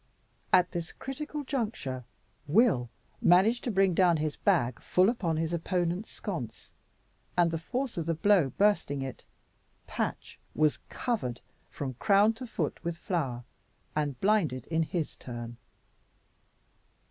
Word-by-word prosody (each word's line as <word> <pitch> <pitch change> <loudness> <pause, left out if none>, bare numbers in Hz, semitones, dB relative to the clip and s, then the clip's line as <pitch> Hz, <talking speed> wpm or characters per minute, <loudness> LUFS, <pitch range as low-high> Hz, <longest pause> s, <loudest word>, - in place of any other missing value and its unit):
At 180 0 +5
this 170 -1 -4
critical 295 +2 -5
juncture 215 - -3 0.4
Will 150 - +4 0.3
managed 200 +7 +5
to 245 - 0
bring 195 -2 +3
down 175 -1 +4
his 155 -1 -1
bag 120 +1 +1
full 185 +3 +3
upon 175 -9 -1
his 160 +1 -1
opponent's 175 +3 -1
sconce, 165 - -6 0.7
and 170 -1 +4
the 165 - -2
force 250 +8 -3
of 165 - -3
the 165 - +1
blow 180 -3 +4
bursting 190 -7 +1
it, 130 -2 -7 0.6
Patch - - -4 0.2
was 155 -1 +2
covered 205 - -2 0.3
from 135 -2 -4
crown 205 +2 +5
to 245 +3 -8
foot 165 -9 -3
with 170 -1 -3
flour, 140 -10 -2 0.5
and 145 -4 -1
blinded 165 - +2
in 160 0 +2
his 160 0 -2
turn. 120 -1 -7
170 Hz, 135 wpm, -29 LUFS, 145-205 Hz, 0.7 s, At